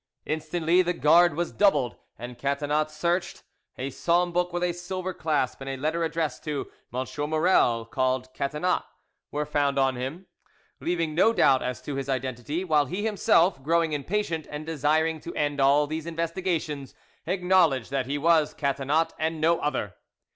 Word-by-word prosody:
Instantly 160 +3 +1
the 180 0 0
guard 165 +1 +5
was 170 +1 -2
doubled, 145 - +2 0.2
and 120 0 -8
Catinat 145 +3 0
searched: 170 +3 -2 0.3
a 135 +2 -4
psalm 175 +5 +1
book 180 +1 0
with 175 0 -2
a 175 -1 +1
silver 185 +1 -5
clasp 150 -7 -1
and 135 - -5
a 135 - -3
letter 155 +5 -1
addressed 160 -3 -2
to 150 -2 -3 0.2
"M. 130 +2 -2 0.2
Maurel, 155 -8 +3
called 130 +1 -1
Catinat," 150 +7 0 0.5
were 150 +1 -2
found 145 -1 0
on 135 -1 +2
him, 140 +9 -5 0.5
leaving 170 -2 -1
no 220 +8 +4
doubt 135 - +4
as 125 0 -4
to 145 -2 -4
his 135 0 -4
identity; 130 +5 -2
while 150 -5 +2
he 190 +9 -3
himself, 180 -6 +3
growing 165 +2 +1
impatient, 165 +2 -2
and 150 +1 -6
desiring 160 +1 +1
to 170 - -8
end 145 -1 0
all 140 +2 +5
these 155 +2 -5
investigations, 165 -4 -3 0.3
acknowledged 180 -8 +2
that 135 -2 -1
he 140 +2 -1
was 160 0 +3
Catinat 140 +3 0
and 160 0 -1
no 165 +2 +3
other. 130 -10 -2
155 Hz, 160 wpm, -26 LUFS, 140-170 Hz, 0.5 s, guard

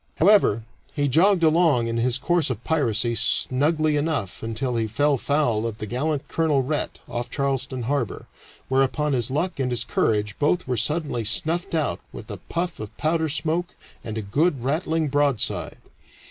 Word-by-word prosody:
However, 170 - +4 0.3
he 145 -1 +1
jogged 175 +6 +4
along 160 -6 +4
in 115 0 -2
his 120 +1 +1
course 170 +2 +1
of 120 -2 -4
piracy 120 -7 +1
snugly 150 +7 +1
enough 145 - -2
until 115 +3 -2
he 115 -1 0
fell 145 +7 +2
foul 120 -7 +1
of 110 -2 -5
the 105 - -5
gallant 140 +6 -2
Colonel 150 -4 +1
Rhett, 150 +3 -3
off 120 0 -4
Charleston 135 -2 -2
Harbor, 125 -4 -2 0.4
whereupon 135 +3 +1
his 120 -2 0
luck 155 +5 -2
and 130 -2 0
his 120 -1 -1
courage 105 -1 0
both 165 +5 +1
were 125 - 0
suddenly 145 0 -1
snuffed 165 - 0
out 155 -3 0
with - - -9
a - - -5
puff 175 +1 -4
of 110 -2 -8
powder 160 0 +1
smoke 165 +4 -2 0.3
and 110 -2 -5
a 110 - -3
good 140 - +1
rattling 155 +3 0
broadside. 145 -4 0
140 Hz, 165 wpm, -24 LUFS, 120-155 Hz, 0.4 s, However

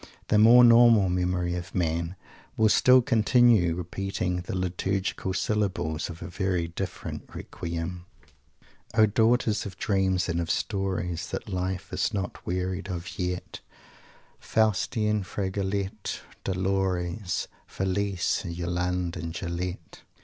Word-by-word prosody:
The 105 - +4
more 120 +3 +8
normal 115 -4 +7
memory 90 -1 0
of 90 +1 -6
man 85 0 -1 0.4
will 110 -1 +4
still 125 +3 +6
continue 115 -6 +4
repeating 90 +1 -3
the 85 +2 -4
liturgical 95 +1 -2
syllables 95 -8 -1
of 85 -1 -8
a - - -6
very 90 -2 -1
different 85 - -6
requiem: 85 +1 -5 0.9
"O 110 -1 +7
daughters 110 0 +2
of 95 -1 -10
dreams 95 -3 +1
and 85 -1 -1
of 85 - -4
stories, 95 -5 -2
That - - -5
Life 90 0 -3
is - - 0
not 95 -2 -4
wearied 90 +2 -2
of 90 +2 -6
yet 90 0 -3 0.8
Faustine, 105 0 +1
Fragoletta, 100 +1 -3 0.2
Dolores, 95 0 -1 0.2
Felise, 95 -1 -1
and 85 -1 -6
Yolande 90 0 -2
and 80 +1 -5
Julette!" 85 -1 -5
95 Hz, 120 wpm, -27 LUFS, 90-100 Hz, 0.9 s, more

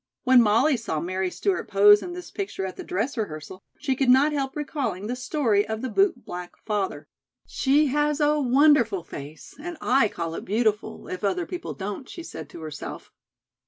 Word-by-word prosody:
When 255 -1 +7
Molly 230 +6 +3
saw 185 -9 -3
Mary 185 +3 -2
Stewart 380 - -1
pose 205 +1 +7
in 350 - -6
this 360 0 -8
picture 385 - -4
at 185 - -5
the - - -7
dress 220 +10 -2
rehearsal, 185 -2 -5 0.2
she 270 -3 -1
could 265 -1 +1
not 275 +4 +5
help 270 -2 -2
recalling 265 - -3
the 245 +3 -2
story 250 -5 +1
of 220 +2 -4
the 260 - -2
bootblack 250 - -1
father. 195 -8 -2 0.4
"She 290 +3 +2
has 295 0 +1
a 300 0 +3
wonderful 255 - +4
face, 150 -1 -10
and 345 +2 -6
I 255 -2 +3
call 165 -4 -4
it - - -5
beautiful, 215 0 -1
if 185 - -6
other 335 - 0
people 355 0 -6
don't," 205 +5 -6
she 340 - -8
said 160 - -8
to 165 - -10
herself. 155 -2 -7
235 Hz, 185 wpm, -25 LUFS, 190-295 Hz, 0.4 s, When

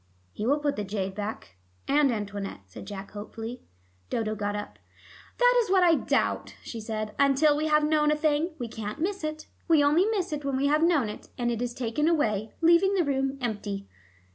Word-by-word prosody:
"He 215 - -3
will 285 +3 +4
put 290 -4 -1
the 210 - -1
jade 195 -1 -3
back 205 - -6 0.3
and 285 -1 +4
Antoinette," 205 - -4
said 95 - -11
Jack 195 -1 -7
hopefully. 225 +3 -7 0.5
Dodo 220 -2 -1
got 205 -1 -2
up. 205 0 -6 0.6
"That - - +5
is 445 - -4
what 380 -1 +4
I 340 -2 +6
doubt," - - 0
she 230 - -6
said. 215 -1 -4
"Until 280 +2 +4
we 305 +1 0
have 300 0 +4
known 300 0 +3
a 300 - +3
thing, 310 +2 0
we 245 - -4
can't 220 +3 -6
miss 390 +2 -2
it. 310 0 -4 0.2
We 320 -4 +5
only 305 +6 +4
miss 385 -7 -1
it 295 -1 -4
when 275 -1 -1
we 275 - +1
have 300 +2 +3
known 325 -8 +3
it, 210 - -8
and 240 -1 0
it 235 0 -3
is 245 -1 -3
taken 255 +5 0
away, 220 -10 +1
leaving 340 +4 +5
the 365 - +3
room 270 -1 0
empty. 205 -4 -3
270 Hz, 205 wpm, -27 LUFS, 215-310 Hz, 0.6 s, I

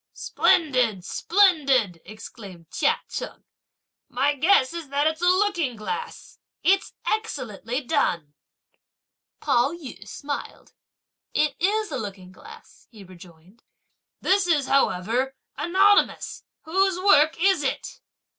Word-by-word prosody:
"Splendid! 250 - +1
splendid!" 275 - +2
exclaimed 195 -5 -12
Chia - - +1
Cheng, - - -7 0.7
"my 275 +4 +1
guess 290 -1 +3
is 335 -4 -7
that 285 +1 0
it's 315 +1 0
a - - +1
looking 360 - +1
glass. 445 - -7 0.2
It's 390 +2 +2
excellently 250 - -3
done!" 170 - -1 1.1
Pao 275 0 +2
yü 255 - -10
smiled. 285 +6 -7 0.6
"It 300 -2 +1
is 420 +4 0
a - - -3
looking 190 -3 -8
glass!" - - -16
he 215 -5 -14
rejoined. 180 +3 -17 0.6
"This 380 -1 +2
is, 300 -5 +2
however, 260 0 0 0.2
anonymous; 390 +4 +2 0.2
whose 375 +3 +1
work 310 -5 +4
is 380 -2 +3
it?" 275 - -4
280 Hz, 110 wpm, -24 LUFS, 215-360 Hz, 1.1 s, work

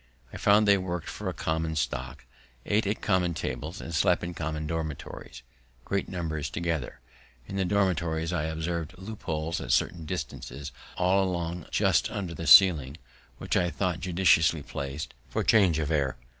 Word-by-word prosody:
I - - -5
found 105 +1 +4
they 100 -1 +6
work'd 90 -3 -4
for - - -4
a - - -1
common 80 0 -2
stock, 65 -1 -3 0.4
ate 105 0 +1
at 105 - -2
common 90 -4 +1
tables, 75 +6 -4
and 85 - -7
slept 85 +3 +2
in 85 0 -4
common 80 -1 -3
dormitories, 75 -5 -5 0.4
great 100 -1 -1
numbers 80 -4 -3
together. 80 -8 -3 0.4
In 95 - -7
the 95 -1 +1
dormitories 85 -4 0
I 80 -4 0
observed 80 +2 -3
loopholes, 85 -5 -4
at - - -3
certain 80 -2 +1
distances 75 -3 -5 0.3
all 95 +2 +3
along 85 -2 -3
just - - +2
under 95 -4 -4
the 85 0 -5
ceiling, 80 -7 +7 0.4
which - - -2
I 90 -1 +2
thought 90 -1 -1
judiciously 85 -4 +3
placed 70 +2 -5 0.2
for - - -1
change 95 -8 +4
of 80 0 -1
air. 70 -5 0
85 Hz, 160 wpm, -28 LUFS, 75-90 Hz, 0.4 s, ceiling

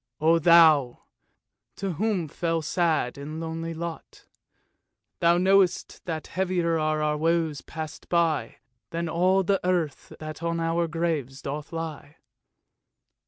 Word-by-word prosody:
O 165 +2 +4
Thou! 155 -6 +5 0.7
to 195 -1 -3
whom 195 -1 -1
fell 165 +2 -2
sad 155 -6 0
and 155 +3 -6
lonely 165 0 -4
lot, 170 0 -7 0.9
Thou 170 0 +4
knowst, 190 0 +2
that 160 -3 -4
heavier 175 -3 0
are 155 0 0
our 150 0 +1
woes 160 -1 0
passed 155 -1 -8
by, 165 -4 +1 0.3
Than 170 0 -3
all 185 +4 +2
the 195 +1 +1
earth 175 -5 -1
that 155 +1 -7
on 170 0 -1
our 165 +1 0
graves 155 -5 -2
doth 145 +2 -5
lie." 160 -2 -6
165 Hz, 125 wpm, -26 LUFS, 155-170 Hz, 0.9 s, Thou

